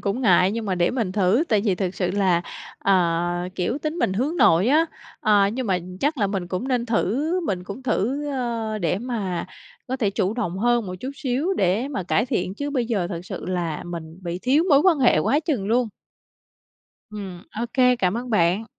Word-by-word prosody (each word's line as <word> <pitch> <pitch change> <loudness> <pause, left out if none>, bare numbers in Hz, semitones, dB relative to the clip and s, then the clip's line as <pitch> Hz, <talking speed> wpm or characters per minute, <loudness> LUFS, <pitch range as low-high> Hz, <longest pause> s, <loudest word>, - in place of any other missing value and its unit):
cũng 200 +5 -2
ngại, 185 -3 +5
nhưng 230 0 -3
mà 190 - 0
để 175 -1 +2
mình 225 -7 -2
thử 205 - +3
tại 215 -2 +3
vì 200 -2 +1
thực 185 0 -2
sự 180 -2 -1
là, 185 -3 +2 0.4
ờ, 175 -1 +1
kiểu, 190 +10 -1
tính 305 +3 -3
mình 190 - +1
hướng 265 - -1
nội 175 - +5
á, 315 +4 +4 0.3
ờ, 205 -2 +4
nhưng 255 +1 -3
mà 190 -3 +1 0.2
chắc 295 +1 0
là 205 - +2
mình 195 -3 -3
cũng 185 +9 -3
nên 245 -2 0
thử, 240 - 0
mình 190 - -3
cũng 200 +7 -8
thử, 260 +4 -1
ơ, 230 -5 -2
để 180 -1 0
mà 210 -8 -3 0.4
có 260 - -2
thể 220 -7 +1
chủ 195 +1 -1
động 190 -7 -2
hơn 240 0 +2
một 180 - -5
chút 260 - -4
xíu 275 +6 -1
để 200 - +1
mà 265 -10 -3
cải 205 +6 +1
thiện, 185 -5 -1
chứ 285 +6 -4
bây 255 -5 0
giờ 205 -7 0
thật 170 -3 -4
sự - - -6
là 175 -4 -2
mình 165 -1 -7
bị 175 0 -4
thiếu 280 +6 +3
mối 280 -4 +6
quan 345 -2 +4
hệ 250 - +4
quá 275 - +2
chừng 280 - -1
luôn. 235 +2 +2 1.2
Ừm, 195 -4 -7
OK, 235 +2 -5 0.3
cảm 185 -2 +1
ơn 245 +1 -5
bạn. 185 +1 +2
210 Hz, 210 wpm, -23 LUFS, 180-255 Hz, 1.2 s, mối